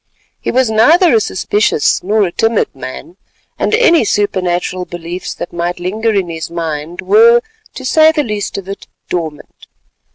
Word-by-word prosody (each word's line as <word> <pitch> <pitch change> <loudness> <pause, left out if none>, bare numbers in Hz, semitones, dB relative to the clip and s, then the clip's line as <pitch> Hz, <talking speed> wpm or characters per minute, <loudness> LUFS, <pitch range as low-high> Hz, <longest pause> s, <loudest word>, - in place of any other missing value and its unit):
He - - -4
was 255 -2 +2
neither 315 - +5
a 225 - +5
superstitious 205 -4 0
nor 210 +3 +1
a 180 - -1
timid 225 +4 0
man, 135 +7 -9 0.4
and - - +1
any 390 - +4
supernatural 185 -3 -1
beliefs 175 +1 -6
that - - -7
might 175 +1 -3
linger 215 +6 -1
in 195 -4 0
his 165 -1 -6
mind 165 0 -4
were, 465 +4 +5 0.3
to 260 - -7
say 315 +3 +5
the 305 -2 0
least 210 -5 -4
of 195 -1 -7
it, 195 0 -8 0.2
dormant. 160 -4 -6
200 Hz, 160 wpm, -14 LUFS, 175-240 Hz, 0.4 s, neither